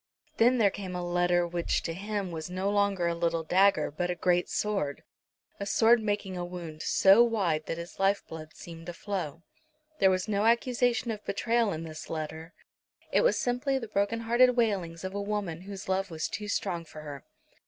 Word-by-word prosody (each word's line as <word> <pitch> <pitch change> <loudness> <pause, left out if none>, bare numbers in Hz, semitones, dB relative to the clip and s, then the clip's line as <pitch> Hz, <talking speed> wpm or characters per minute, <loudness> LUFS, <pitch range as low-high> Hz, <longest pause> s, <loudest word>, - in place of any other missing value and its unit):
Then 245 +3 +5
there 205 -4 +4
came 185 -3 -6
a 180 0 -3
letter 175 0 +2
which 170 0 -1
to 165 - -3
him 200 0 -3
was 160 0 -5
no 185 +2 -1
longer 200 -3 +1
a 170 - +1
little 170 -1 0
dagger, 185 -2 +3
but 175 +4 -2
a 180 - -1
great 175 +1 +1
sword, 195 -10 -2 0.6
a 200 - -4
sword 230 +2 +4
making 205 -3 -2
a 175 - -3
wound 170 -3 -7
so 195 +7 +6
wide 190 -10 0
that 165 - -3
his 170 +1 -9
life 195 +1 +2
blood 155 -1 -9
seemed 165 -1 -10
to 175 - -5
flow. 170 -4 -4 0.6
There 190 - +6
was 185 +1 0
no 210 +1 +1
accusation 240 0 +2
of 210 -1 -6
betrayal 230 +1 +1
in 160 -1 -4
this 155 -1 -8
letter. 160 +1 -5 0.6
It - - +4
was - - +3
simply 255 +3 0
the 235 -4 -5
broken 205 +3 0
hearted 245 +2 +4
wailings 190 -8 0
of 190 0 -4
a 200 - -2
woman 200 -5 -3
whose 195 0 -8
love 190 +1 0
was 160 -2 -3
too 210 0 -5
strong 180 -4 -2
for 155 -1 -11
her. 145 -2 -8
190 Hz, 195 wpm, -29 LUFS, 170-210 Hz, 0.6 s, so